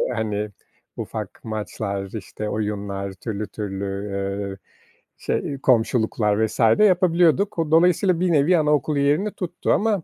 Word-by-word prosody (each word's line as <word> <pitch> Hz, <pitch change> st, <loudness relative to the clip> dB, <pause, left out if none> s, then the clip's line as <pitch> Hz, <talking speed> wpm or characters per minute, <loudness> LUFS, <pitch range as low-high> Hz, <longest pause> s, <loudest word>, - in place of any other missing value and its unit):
hani, 105 Hz, -1 st, -2 dB, 0.5 s
ufak -, -, -6 dB
maçlar, 105 Hz, -3 st, -4 dB
işte, 105 Hz, 0 st, -5 dB
oyunlar, 100 Hz, -2 st, -3 dB
türlü, 105 Hz, +2 st, -5 dB
türlü, 100 Hz, -2 st, -5 dB, 0.3 s
eee, 100 Hz, 0 st, -3 dB, 0.6 s
şey, 140 Hz, -2 st, -2 dB
komşuluklar 110 Hz, -3 st, +2 dB
vs. -, -, -10 dB, 0.2 s
yapabiliyorduk. 180 Hz, 0 st, +3 dB
Dolayısıyla 175 Hz, +2 st, +4 dB
bir 180 Hz, -1 st, +1 dB
nevi 160 Hz, +4 st, +4 dB
anaokulu 150 Hz, -1 st, +1 dB
yerini 150 Hz, +9 st, +2 dB
tuttu 175 Hz, -2 st, -3 dB
ama 205 Hz, -5 st, +1 dB
115 Hz, 115 wpm, -23 LUFS, 105-170 Hz, 0.6 s, Dolayısıyla